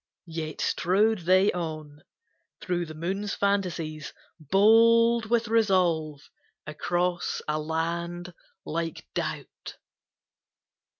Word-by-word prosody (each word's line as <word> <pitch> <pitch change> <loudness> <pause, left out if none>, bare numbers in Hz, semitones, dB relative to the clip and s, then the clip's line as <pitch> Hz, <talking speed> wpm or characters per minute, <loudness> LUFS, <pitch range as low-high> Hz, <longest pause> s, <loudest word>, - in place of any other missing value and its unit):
Yet 160 -2 -5
strode 205 +4 +2
they 185 +2 +5
on, 155 -4 -6 0.6
through 175 -2 -2
the 155 - -9
moon's 195 +5 -3
fantasies, 175 -7 -2 0.3
Bold 230 - +4
with 235 0 +1
resolve, 180 -9 +1 0.4
across 175 +3 -2
a 150 0 0
land 170 +3 -3 0.3
like 165 0 -4
doubt. - - -5
175 Hz, 85 wpm, -27 LUFS, 160-200 Hz, 0.6 s, they